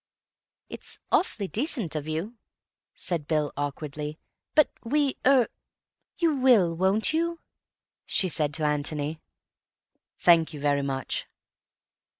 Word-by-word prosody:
"It's -, -, -4 dB
awfully 215 Hz, -, +1 dB
decent 230 Hz, -, 0 dB
of 150 Hz, 0 st, -3 dB
you," 160 Hz, +8 st, -3 dB, 0.6 s
said 165 Hz, -5 st, -1 dB
Bill 155 Hz, -2 st, 0 dB
awkwardly, 150 Hz, +1 st, -4 dB, 0.4 s
"but 305 Hz, -, +6 dB, 0.2 s
we—er—" 270 Hz, -1 st, +2 dB, 0.7 s
"You 330 Hz, -3 st, +2 dB
will, 235 Hz, -10 st, +4 dB
won't 190 Hz, -, +2 dB
you?" 335 Hz, +1 st, 0 dB, 0.7 s
she 190 Hz, -, +2 dB
said 155 Hz, -4 st, 0 dB
to 155 Hz, -, -1 dB
Antony. 150 Hz, +1 st, -1 dB, 1.0 s
"Thank 165 Hz, -2 st, +4 dB
you -, -, -7 dB
very 145 Hz, 0 st, +1 dB
much." 135 Hz, -1 st, -3 dB
165 Hz, 110 wpm, -27 LUFS, 150-245 Hz, 1.0 s, but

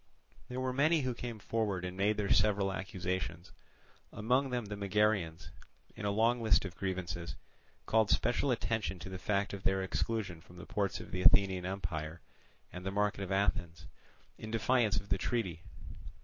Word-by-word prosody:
There 125 Hz, +1 st, -3 dB
were 130 Hz, 0 st, -1 dB
many 155 Hz, +4 st, +4 dB
who 130 Hz, -2 st, -1 dB
came 120 Hz, -1 st, -5 dB
forward 105 Hz, -4 st, -1 dB
and 90 Hz, 0 st, -5 dB
made 100 Hz, +2 st, +2 dB
their 100 Hz, -2 st, +2 dB
several 100 Hz, -1 st, +3 dB
accusations; 90 Hz, -2 st, -3 dB, 0.6 s
among 125 Hz, +6 st, +1 dB
them 125 Hz, -3 st, -1 dB
the 105 Hz, 0 st, -5 dB
Megarians, 100 Hz, -6 st, +1 dB, 0.4 s
in 105 Hz, -, -5 dB
a -, -, +2 dB
long 115 Hz, +4 st, +2 dB
list 110 Hz, -3 st, +4 dB
of 90 Hz, -3 st, -6 dB
grievances, 85 Hz, -2 st, -3 dB, 0.5 s
called 110 Hz, -1 st, +3 dB
special 120 Hz, +4 st, +2 dB
attention 110 Hz, -5 st, 0 dB
to 90 Hz, -, -8 dB
the 95 Hz, -1 st, -6 dB
fact 100 Hz, 0 st, 0 dB
of 100 Hz, -, -5 dB
their 95 Hz, 0 st, +1 dB
exclusion 95 Hz, -3 st, -2 dB
from 90 Hz, +1 st, -16 dB
the 90 Hz, -, -9 dB
ports 100 Hz, -2 st, -1 dB
of -, -, -10 dB
the 90 Hz, -, -2 dB
Athenian 95 Hz, -1 st, +5 dB
empire 85 Hz, -4 st, -4 dB, 0.5 s
and 90 Hz, -, -7 dB
the 95 Hz, -, -2 dB
market 105 Hz, 0 st, 0 dB
of 95 Hz, 0 st, -4 dB
Athens, 95 Hz, -3 st, 0 dB, 0.5 s
in 110 Hz, -, -7 dB
defiance 115 Hz, -1 st, +2 dB
of 100 Hz, 0 st, -4 dB
the 95 Hz, -, +1 dB
treaty. 95 Hz, -7 st, -1 dB
100 Hz, 175 wpm, -33 LUFS, 90-110 Hz, 0.6 s, Athenian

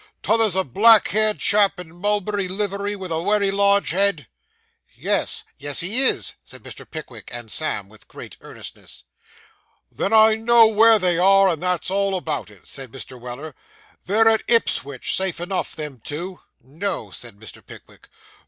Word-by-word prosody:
'T' -, -, -2 dB
other's 225 Hz, -4 st, +3 dB
a 190 Hz, -, +1 dB
black 215 Hz, -, +5 dB
haired 215 Hz, 0 st, +1 dB
chap 200 Hz, -2 st, +3 dB
in 170 Hz, -2 st, -11 dB
mulberry 205 Hz, +1 st, -1 dB
livery, 200 Hz, +1 st, -3 dB
with 190 Hz, -3 st, -8 dB
a 160 Hz, 0 st, -1 dB
wery 205 Hz, +1 st, +1 dB
large 200 Hz, 0 st, +2 dB
head?' 190 Hz, -6 st, +1 dB, 0.7 s
'Yes, -, -, 0 dB, 0.2 s
yes, 145 Hz, 0 st, -2 dB
he 205 Hz, +9 st, 0 dB
is,' 265 Hz, -, +3 dB
said -, -, -13 dB
Mr. -, -, -10 dB
Pickwick 130 Hz, -9 st, -9 dB
and 120 Hz, -2 st, -7 dB
Sam, 130 Hz, -11 st, -1 dB
with 110 Hz, +1 st, -19 dB
great -, -, -11 dB
earnestness. -, -, -10 dB, 0.9 s
'Then 195 Hz, -, -3 dB
I 220 Hz, 0 st, +6 dB
know 230 Hz, +1 st, +5 dB
where 220 Hz, +1 st, +5 dB
they 180 Hz, -4 st, 0 dB
are, 195 Hz, +1 st, +5 dB
and 165 Hz, -4 st, -2 dB
that's 180 Hz, 0 st, -1 dB
all 195 Hz, 0 st, 0 dB
about 160 Hz, -, -4 dB
it,' 100 Hz, -3 st, -19 dB
said 135 Hz, -4 st, -6 dB
Mr. 130 Hz, 0 st, -9 dB
Weller; 125 Hz, +5 st, -8 dB, 0.5 s
'they're 220 Hz, +4 st, +3 dB
at 220 Hz, -1 st, +4 dB
Ipswich, 140 Hz, -, 0 dB
safe 190 Hz, -3 st, -1 dB
enough, 180 Hz, +2 st, -4 dB
them 150 Hz, -6 st, -8 dB
two.' 175 Hz, +5 st, -6 dB, 0.2 s
'No!' 165 Hz, +11 st, -5 dB
said 115 Hz, -4 st, -8 dB
Mr. 110 Hz, -, -12 dB
Pickwick. -, -, -16 dB
190 Hz, 165 wpm, -21 LUFS, 150-205 Hz, 0.9 s, I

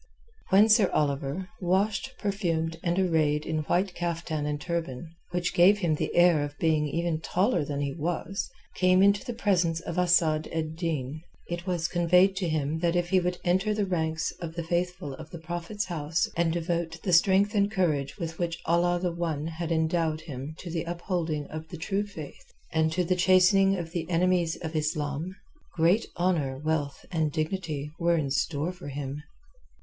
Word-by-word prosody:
When 200 Hz, +3 st, +6 dB
Sir 215 Hz, -3 st, +5 dB
Oliver, 145 Hz, +4 st, -1 dB
washed, 200 Hz, +8 st, 0 dB
perfumed, 165 Hz, -6 st, -1 dB
and 175 Hz, 0 st, 0 dB
arrayed 155 Hz, -5 st, +2 dB
in 160 Hz, -1 st, -1 dB
white 180 Hz, +3 st, +1 dB
caftan 165 Hz, -3 st, -2 dB
and 150 Hz, 0 st, -2 dB
turban, 165 Hz, -3 st, -4 dB, 0.2 s
which 175 Hz, 0 st, -1 dB
gave 185 Hz, +4 st, +6 dB
him 175 Hz, -6 st, +1 dB
the 150 Hz, -, -2 dB
air 175 Hz, -4 st, +5 dB
of 145 Hz, 0 st, -6 dB
being 155 Hz, -2 st, +2 dB
even 165 Hz, +1 st, -1 dB
taller 190 Hz, +3 st, +1 dB
than 145 Hz, 0 st, -3 dB
he 140 Hz, -1 st, -2 dB
was, 170 Hz, +5 st, -3 dB, 0.3 s
came 185 Hz, +1 st, +5 dB
into 200 Hz, +2 st, +4 dB
the 245 Hz, -3 st, -5 dB
presence 175 Hz, -7 st, +1 dB
of 170 Hz, +1 st, -4 dB
Asad 165 Hz, -3 st, +3 dB
ed 160 Hz, -1 st, -3 dB
Din, 155 Hz, -4 st, -3 dB, 0.3 s
it 175 Hz, +1 st, -5 dB
was 175 Hz, -3 st, 0 dB
conveyed 180 Hz, +2 st, +4 dB
to 180 Hz, -3 st, -1 dB
him 155 Hz, 0 st, -1 dB
that 170 Hz, 0 st, +1 dB
if 175 Hz, 0 st, 0 dB
he 185 Hz, -, +4 dB
would 180 Hz, 0 st, -1 dB
enter 190 Hz, +4 st, +2 dB
the 210 Hz, -1 st, +1 dB
ranks 160 Hz, -3 st, -1 dB
of 165 Hz, -1 st, -5 dB
the 170 Hz, -, -3 dB
Faithful 175 Hz, -3 st, -2 dB
of 155 Hz, +3 st, -10 dB
the 170 Hz, -, -8 dB
Prophet's 175 Hz, +5 st, -4 dB
House 165 Hz, -1 st, -1 dB
and 170 Hz, -1 st, +2 dB
devote 170 Hz, -1 st, -2 dB
the 180 Hz, -, 0 dB
strength 195 Hz, +4 st, +4 dB
and 200 Hz, -1 st, +3 dB
courage 155 Hz, -9 st, 0 dB
with 165 Hz, -1 st, -5 dB
which 170 Hz, -1 st, -1 dB
Allah 175 Hz, +1 st, +2 dB
the 180 Hz, 0 st, -1 dB
One 165 Hz, -3 st, -2 dB
had 165 Hz, +1 st, -4 dB
endowed 160 Hz, -1 st, +1 dB
him 145 Hz, -1 st, -7 dB
to 175 Hz, -, -7 dB
the 165 Hz, -1 st, -1 dB
upholding 170 Hz, -3 st, -2 dB
of 155 Hz, +1 st, -6 dB
the 170 Hz, -, -8 dB
true 195 Hz, +5 st, -1 dB
Faith 155 Hz, -8 st, -10 dB, 0.2 s
and 160 Hz, 0 st, +2 dB
to 180 Hz, +3 st, +1 dB
the 180 Hz, +1 st, +1 dB
chastening 190 Hz, +2 st, +5 dB
of 165 Hz, -2 st, -5 dB
the 170 Hz, -1 st, -4 dB
enemies 175 Hz, -1 st, +2 dB
of 160 Hz, 0 st, -4 dB
Islam, 155 Hz, +2 st, -2 dB, 0.4 s
great 175 Hz, +7 st, +3 dB
honour, 165 Hz, -7 st, +1 dB
wealth 150 Hz, -1 st, -2 dB
and 160 Hz, -3 st, 0 dB
dignity 155 Hz, -2 st, -3 dB
were 170 Hz, 0 st, +3 dB
in 140 Hz, -4 st, -1 dB
store 145 Hz, +4 st, 0 dB
for 180 Hz, -4 st, -11 dB
him. 140 Hz, +1 st, -5 dB
170 Hz, 185 wpm, -28 LUFS, 155-180 Hz, 0.4 s, When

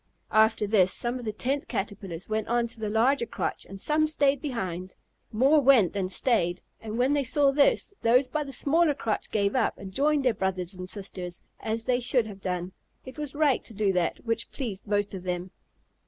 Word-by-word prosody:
After 220 Hz, 0 st, +4 dB
this, 195 Hz, -3 st, +3 dB
some 245 Hz, +1 st, 0 dB
of 245 Hz, -, -8 dB
the 215 Hz, -, -1 dB
Tent 270 Hz, +6 st, -2 dB
Caterpillars 195 Hz, -5 st, -5 dB
went 215 Hz, 0 st, -2 dB
on 240 Hz, 0 st, +1 dB
to 230 Hz, -1 st, -6 dB
the 215 Hz, -1 st, -2 dB
larger 235 Hz, +4 st, +2 dB
crotch -, -, -3 dB
and 195 Hz, 0 st, -8 dB
some 310 Hz, +7 st, +2 dB
stayed 285 Hz, -3 st, +1 dB
behind. 185 Hz, -, -4 dB, 0.4 s
More 275 Hz, +7 st, +4 dB
went 255 Hz, -9 st, +5 dB
than 190 Hz, -2 st, -2 dB
stayed, 185 Hz, -5 st, +1 dB, 0.2 s
and 220 Hz, 0 st, -5 dB
when 255 Hz, +3 st, +2 dB
they 285 Hz, -1 st, +2 dB
saw 280 Hz, +2 st, +3 dB
this, 285 Hz, +7 st, +3 dB
those 250 Hz, +3 st, +4 dB
by 305 Hz, +2 st, -2 dB
the 275 Hz, -, -8 dB
smaller 295 Hz, +4 st, +2 dB
crotch 220 Hz, -6 st, -2 dB
gave 200 Hz, -1 st, 0 dB
up -, -, +1 dB
and 195 Hz, -1 st, -9 dB
joined 290 Hz, +3 st, +2 dB
their 250 Hz, -, +4 dB
brothers 190 Hz, -2 st, -2 dB
and 185 Hz, 0 st, -7 dB
sisters, 185 Hz, -3 st, -5 dB, 0.2 s
as 225 Hz, +1 st, -2 dB
they 250 Hz, -1 st, +2 dB
should 245 Hz, -1 st, +2 dB
have 200 Hz, -3 st, -10 dB
done. 180 Hz, -1 st, -3 dB, 0.3 s
It 260 Hz, +3 st, -10 dB
was 295 Hz, -1 st, -4 dB
right 290 Hz, -4 st, +2 dB
to 225 Hz, -, -12 dB
do 200 Hz, -1 st, +1 dB
that 180 Hz, +4 st, -1 dB
which 230 Hz, -1 st, -2 dB
pleased 220 Hz, -7 st, -6 dB
most 205 Hz, 0 st, 0 dB
of 190 Hz, -, -5 dB
them. 180 Hz, 0 st, -4 dB
225 Hz, 205 wpm, -27 LUFS, 195-270 Hz, 0.4 s, went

